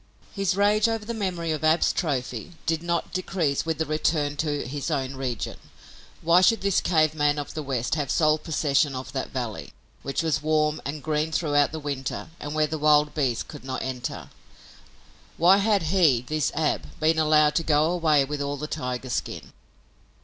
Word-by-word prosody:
His 195 -2 0
rage 210 +2 +3
over 225 -2 -2
the 235 - -4
memory 180 -6 -2
of 155 0 -3
Ab's 155 +2 +3
trophy 130 - -3
did 160 0 0
not 170 -1 -2
decrease 165 -6 -1
with 160 -1 -1
the 160 - -1
return 150 -1 0
to 145 -1 -1
his 140 +2 -4
own 135 -3 -1
region. 130 -4 -4 0.6
Why 170 +2 +5
should 225 +4 +4
this 200 -1 +2
cave 155 -3 +2
man 145 -1 +1
of 145 -1 -5
the 155 - -4
West 130 -4 -2
have 145 -4 -1
sole 155 -1 +3
possession 145 -3 +1
of 130 +1 -6
that 135 - -3
valley, 120 -5 -5 0.3
which 140 +4 -2
was 160 -2 0
warm 155 0 +1
and 145 +1 -5
green 155 0 -1
throughout 145 -3 +2
the 160 - -5
winter 140 0 -4
and 145 +1 -5
where 155 0 +3
the 155 +1 -4
wild 150 0 +4
beasts 130 -7 0
could 150 - -11
not 130 -1 -4
enter? 125 -2 -5 1.1
Why 180 +4 +6
had 205 -2 +2
he, 155 -11 +4
this 155 +3 -1
Ab, 155 -2 -2
been 160 +1 +2
allowed 155 -1 +4
to 165 - +1
go 150 -1 +3
away 155 -5 +3
with 145 +1 -4
all 140 0 -2
the 150 - -4
tiger's 125 -4 -4
skin? - - -4
155 Hz, 185 wpm, -25 LUFS, 140-165 Hz, 1.1 s, Why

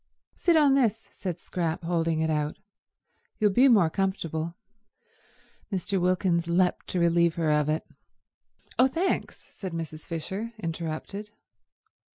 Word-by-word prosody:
"Sit 345 -2 +2
on 295 -3 +5
this," 230 -5 +1
said 180 -4 -4
Scrap, 170 -2 -3
holding 165 -1 0
it 160 0 +1
out. 150 0 -1 0.8
"You'll 210 -2 +3
be 250 +7 +6
more 200 -10 +5
comfortable." 170 -4 -2 1.2
Mr. 195 0 0
Wilkins 180 -2 +1
leapt 180 +1 +1
to 180 - -1
relieve 170 -1 +3
her 160 -2 +1
of 150 0 +2
it. 155 +1 0 0.9
"Oh, 255 - +7
thanks," 335 +8 -1
said 190 -4 -7
Mrs. 160 -1 -6
Fisher, 190 +8 -4
interrupted. 170 +3 -4
175 Hz, 130 wpm, -27 LUFS, 165-205 Hz, 1.2 s, Oh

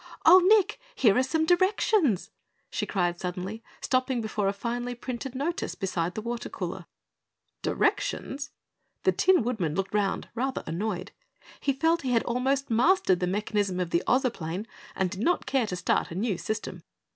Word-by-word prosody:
"Oh, 360 +3 +10
Nick, 410 +3 +4 0.2
here 220 - +4
are 255 - +4
some 315 +5 +1
directions!" 355 - +2 0.4
she - - -2
cried 175 -3 0
suddenly, 185 +4 -4 0.2
stopping 255 -1 +1
before 215 -2 -1
a - - +3
finely 240 +4 -3
printed 250 +2 -5
notice 305 +6 -2
beside 180 -2 -2
the 215 - -4
water 235 0 -4
cooler. - - -5 0.7
"Directions?" 280 +2 -1 0.5
The - - +4
Tin 370 -8 +4
Woodman 200 -11 -1
looked 195 +2 -2
round 205 -2 0
rather 260 +3 -2
annoyed. 185 +1 -3 0.5
He 280 - +1
felt 325 +5 +2
he 255 -2 -1
had 230 - +3
almost 260 +2 0
mastered 235 - +4
the 180 - 0
mechanism 200 -1 -1
of 175 -2 -2
the 170 - +2
Ozoplane 210 -8 0 0.3
and 190 -2 0
did 190 0 -5
not 350 +9 +1
care 265 -5 +1
to 180 - -3
start 175 - 0
a 170 - -7
new 205 +1 0
system. 215 +5 -4
235 Hz, 165 wpm, -27 LUFS, 190-270 Hz, 0.7 s, Oh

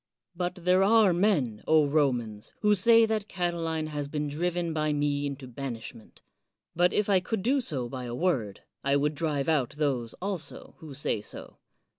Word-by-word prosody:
But 180 +1 -2
there 180 +1 +2
are 210 -2 +5
men, 165 - +1
Romans, 140 -8 +1
who 210 0 +4
say 230 +3 +5
that 215 -2 -2
Catiline 165 -3 -2
has 145 -2 -4
been 150 0 -3
driven 170 +3 -2
by 155 -1 0
me 145 0 0
into 140 -1 -7
banishment. 120 -3 -8 0.5
But 175 +1 +3
if 210 - +1
I 195 -2 +4
could 190 +2 -3
do 265 +4 +2
so 135 - -3
by 125 +1 -6
a 120 0 -5
word, 125 - -1 0.2
I 140 0 +2
would 145 +2 +1
drive 150 -2 -1
out 145 -6 +1
those 130 -6 -1
also 190 -4 -5
who 155 -5 -10
say 130 -6 -1
so. 105 - -8
155 Hz, 170 wpm, -28 LUFS, 140-180 Hz, 0.5 s, are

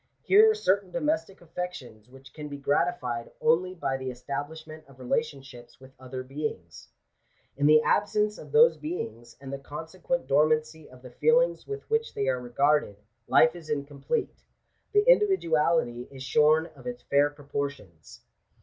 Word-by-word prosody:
Here 430 +3 +6
are 435 - +2
certain 200 - +1
domestic 270 - -2
affections, 155 -10 -7
which 135 0 -16
can 150 -1 -7
be 145 - -6
gratified 140 -5 -1
only 180 +4 +2
by 135 -6 -2
the 130 -1 -5
establishment 155 +5 -7
of 135 -2 -18
relationships 135 -2 -4
with 130 0 -16
other 130 0 -7
beings. 130 - -6 0.7
In 145 +1 +2
the 155 0 +6
ab 205 - +2
sence 210 0 -1
of - - -12
those 470 +2 +6
beings, 120 - -6
and 135 0 -8
the 140 - -4
consequent 165 - -4
dormancy 155 +2 +1
of 125 0 -17
the 125 - -11
feelings - - +2
with 420 0 -6
which 450 +1 -1
they 135 - -1
are 130 -1 -1
regarded, 140 -1 +1 0.3
life 160 +1 +5
is 165 -3 -11
incomplete 140 +7 -3 0.2
— - - -46
the 415 +2 +3
individuality 165 - +2
is 135 -1 -10
shorn 150 +4 +3
of - - -12
its 245 0 -6
fair 145 +1 +3
proportions. 140 - -7
150 Hz, 160 wpm, -27 LUFS, 135-180 Hz, 0.7 s, Here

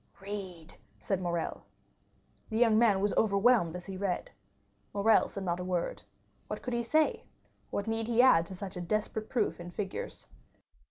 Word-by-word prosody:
"Read!" 195 -5 -7 0.2
said 195 -2 -2
Morrel. 170 -2 -2 0.9
The 220 - -2
young 225 -2 +5
man 210 -5 +4
was 205 0 +1
overwhelmed 200 -4 +3
as 180 0 -7
he 190 -1 -6
read. 190 -2 -2 0.6
Morrel 215 +2 +4
said 195 - -6
not 175 -1 -1
a - - -3
word. 180 -2 -2 0.5
What - - -5
could 250 - -3
he 235 - +1
say? 310 +6 +2 0.5
What 200 - -2
need 225 0 -1
he 235 0 0
add 205 -10 +6
to 190 - -7
such 190 0 -7
a 180 - -4
desperate 215 +4 -2
proof 245 - 0
in 175 0 -7
figures? 190 +2 -5
200 Hz, 170 wpm, -31 LUFS, 180-225 Hz, 0.9 s, add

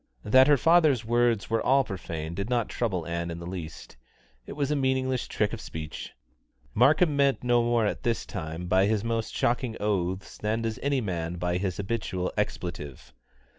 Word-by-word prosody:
That 130 +5 +6
her 145 -1 +6
father's 155 -6 +4
words 120 -2 +1
were 115 - +2
all 135 +1 +4
profane 85 -6 -5
did 100 +5 -4
not 120 -3 0
trouble 95 -9 -2
Ann 85 0 -3
in 85 - -5
the 85 - -8
least. 85 -7 -8 0.5
It - - -6
was 145 0 -1
a - - +2
meaningless 130 -2 0
trick - - -1
of - - -5
speech. 80 -1 -7 0.6
Markham 150 +6 +4
meant 140 -2 +2
no 120 -1 +3
more 120 -1 +2
at 100 - -2
this 115 -2 -1
time 80 -1 -5
by 95 +2 +3
his 110 -1 0
most 115 -1 -2
shocking 120 -1 0
oaths 95 -2 -2
than 110 +2 -1
does 110 -1 -3
any 140 -2 +1
man 85 -5 -3
by 90 0 -1
his 95 -2 -2
habitual 95 -3 -2
expletive. 75 -7 -4
110 Hz, 180 wpm, -27 LUFS, 90-125 Hz, 0.6 s, That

